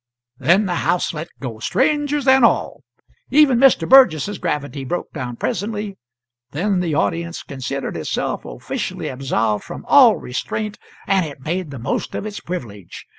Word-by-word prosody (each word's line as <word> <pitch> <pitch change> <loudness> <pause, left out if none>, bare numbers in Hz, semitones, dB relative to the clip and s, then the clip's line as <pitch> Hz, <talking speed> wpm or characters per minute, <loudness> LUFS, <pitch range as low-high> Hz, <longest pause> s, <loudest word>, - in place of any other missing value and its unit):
Then 175 +10 +3
the 175 -2 -1
house 180 - 0
let 155 +1 -5
go, 120 -5 -6
strangers 295 - 0
and 265 -1 +6
all. 230 - +2 0.5
Even 270 -3 +5
Mr. 270 -1 +4
Burgess's 205 - +5
gravity 145 -2 -3
broke 175 +7 -4
down 125 -1 -5
presently, 205 - -3 0.6
then 190 +5 0
the 170 -4 -1
audience 170 +2 -1
considered 135 0 -5
itself 80 - -2
officially - - -5
absolved 115 -5 -1
from - - -9
all - - +7
restraint, 210 +11 -4 0.3
and 195 -2 +2
it 145 -4 -8
made 170 +3 -3
the 140 - -7
most 120 +2 -3
of - - -4
its 210 -1 -5
privilege. 105 - -7
170 Hz, 150 wpm, -20 LUFS, 135-210 Hz, 0.6 s, all